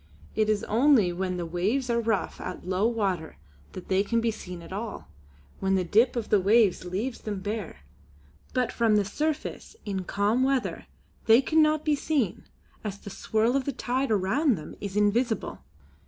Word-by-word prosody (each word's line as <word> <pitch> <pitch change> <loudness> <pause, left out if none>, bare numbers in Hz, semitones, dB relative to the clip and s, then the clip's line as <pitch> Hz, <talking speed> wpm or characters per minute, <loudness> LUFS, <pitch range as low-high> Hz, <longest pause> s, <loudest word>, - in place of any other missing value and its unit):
It 215 0 +1
is 210 -1 +1
only 230 -5 +4
when 185 0 -2
the 175 - -3
waves 195 +11 -1
are 235 - +2
rough 225 -3 -1
at - - -6
low 190 +4 +2
water 195 -8 -2 0.4
that 185 - -8
they 190 +1 +2
can 230 +3 0
be 230 0 +1
seen 180 -5 -8
at 185 - -9
all, 215 +2 -6 0.5
when 195 0 +1
the 185 - +1
dip 225 +9 +3
of 235 -3 -3
the 210 - +4
waves 205 0 +3
leaves 210 +8 -3
them 205 -3 -4
bare; 205 - -5 0.7
but 250 -1 0
from 225 -2 +2
the 205 -1 +3
surface 305 - -3
in 195 -3 -3
calm 205 +7 +1
weather 265 -1 0 0.4
they 225 +1 +8
cannot 310 +2 +2
be 305 -1 +3
seen 280 - -1 0.4
as 205 -2 -4
the 200 - -10
swirl 220 +5 0
of 275 -2 0
the 280 - -1
tide 260 +1 -1
around 220 - +2
them 155 - -9
is 200 0 -4
invisible. 220 +3 +1
215 Hz, 180 wpm, -27 LUFS, 190-250 Hz, 0.7 s, they